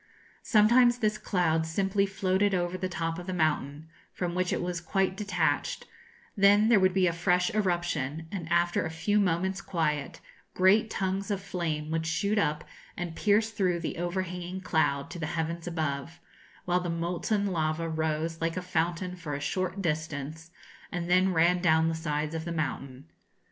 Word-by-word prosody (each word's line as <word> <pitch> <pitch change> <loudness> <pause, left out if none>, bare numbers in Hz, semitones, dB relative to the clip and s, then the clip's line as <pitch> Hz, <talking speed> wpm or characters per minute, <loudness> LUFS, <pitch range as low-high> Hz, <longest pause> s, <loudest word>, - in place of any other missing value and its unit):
Sometimes 240 +3 +5
this 215 -2 0
cloud 160 -4 +1
simply 195 +4 +1
floated 195 +1 +1
over 175 0 -1
the 185 0 -3
top 165 -1 -3
of 175 - -9
the 185 - -2
mountain, 155 -2 -1 0.2
from 175 -1 -3
which 180 0 0
it - - 0
was 175 -1 -3
quite 190 +2 0
detached; 205 0 -1 0.5
then 205 +2 +5
there 230 -4 +6
would 185 -1 +3
be 190 -1 +4
a 170 - +2
fresh 180 +5 +1
eruption; 165 -6 -1
and 170 -5 -5
after 175 0 +2
a 160 - -3
few 165 +6 +1
moments' 190 0 0
quiet, 150 -6 -2 0.4
great 205 +5 +4
tongues 195 +1 -2
of 200 -2 0
flame 165 -5 -3
would 160 0 -1
shoot 200 +6 +1
up 150 -5 0 0.3
and 175 -2 -4
pierce 215 +3 +2
through 185 -5 0
the 165 - -4
overhanging 180 +1 -3
cloud 140 -6 0
to 175 - -7
the 160 - -2
heavens 165 +1 -3
above, 160 -1 -3 0.5
while 180 0 +2
the 180 -1 -4
molten 175 +5 -1
lava 165 -3 -1
rose 160 0 -2
like 165 +1 -1
a - - -1
fountain 175 +1 -1
for 165 -5 -5
a - - -4
short 185 +6 -2
distance, 155 0 -3 0.4
and 175 0 -3
then 185 +1 +4
ran 175 +1 +3
down 160 -2 +4
the - - -1
sides 155 -1 -2
of 160 0 -3
the 170 - -5
mountain. 140 -4 -4
175 Hz, 175 wpm, -28 LUFS, 160-190 Hz, 0.5 s, there